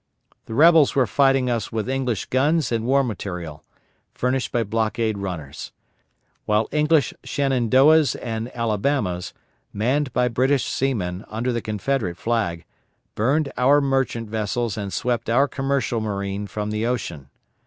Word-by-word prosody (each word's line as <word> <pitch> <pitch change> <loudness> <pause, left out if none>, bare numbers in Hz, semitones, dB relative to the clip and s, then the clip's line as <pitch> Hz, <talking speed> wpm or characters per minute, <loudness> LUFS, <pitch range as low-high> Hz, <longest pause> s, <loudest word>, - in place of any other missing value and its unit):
The 110 - -5
rebels 160 +1 +6
were 135 -2 +4
fighting 135 +1 +2
us 120 -2 -2
with 110 0 -2
English 130 -5 -1
guns 145 +2 +1
and 115 -1 -1
war 140 +1 +4
material, 90 - -5 0.5
furnished 125 0 -1
by 120 - +1
blockade 110 0 -1
runners; 85 -8 -6 0.7
while 105 +1 +1
English 150 -1 +2
Shenandoahs 135 +3 +3
and 115 0 -4
Alabamas, 105 -5 -1 0.4
manned 130 +6 0
by 125 0 +2
British 130 +3 +1
seamen, 100 -8 -2
under 120 +3 -2
the 115 - -2
Confederate 105 -3 -2
flag, 100 -8 -1 0.5
burned 140 +6 +1
our 140 +3 +5
merchant 135 -4 0
vessels 110 +1 -2
and 100 -2 -4
swept 120 0 -1
our 135 +5 +4
commercial 135 -5 -1
marine 100 -1 -3
from 105 +2 -4
the 105 +1 -2
ocean. 85 - -3
120 Hz, 135 wpm, -23 LUFS, 105-135 Hz, 0.7 s, rebels